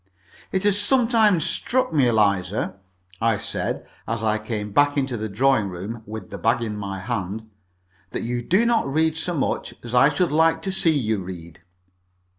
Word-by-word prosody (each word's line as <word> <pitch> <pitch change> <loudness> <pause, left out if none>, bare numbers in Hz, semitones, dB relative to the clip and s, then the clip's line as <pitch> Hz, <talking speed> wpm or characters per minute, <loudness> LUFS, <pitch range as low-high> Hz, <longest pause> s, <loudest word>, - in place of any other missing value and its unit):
"It 190 0 0
has 205 0 +4
sometimes 225 - +3
struck 255 -3 0
me, 140 -5 +4
Eliza," 100 -3 +1 0.5
I 115 -2 +2
said, - - -4 0.2
as 115 +1 -2
I 110 -1 +1
came 105 -1 -4
back 145 +5 +3
into 135 -3 0
the 110 -1 -4
dining 110 0 +2
room, 100 +6 -6
with 110 +1 -8
the - - -6
bag 115 +1 +1
in 110 -2 -3
my 100 -2 -5
hand, 110 0 -4 0.6
"that - - -4
you 120 +1 -2
do 190 - +2
not 230 -12 +1
read 160 +2 +2
so 175 +2 -2
much 140 - -2
as 120 0 -7
I 130 +3 +6
should 160 +3 0
like 160 +1 +3
to 190 - -2
see 185 -3 +2
you 110 -9 +1
read." 90 -2 -9
120 Hz, 180 wpm, -23 LUFS, 105-160 Hz, 0.6 s, I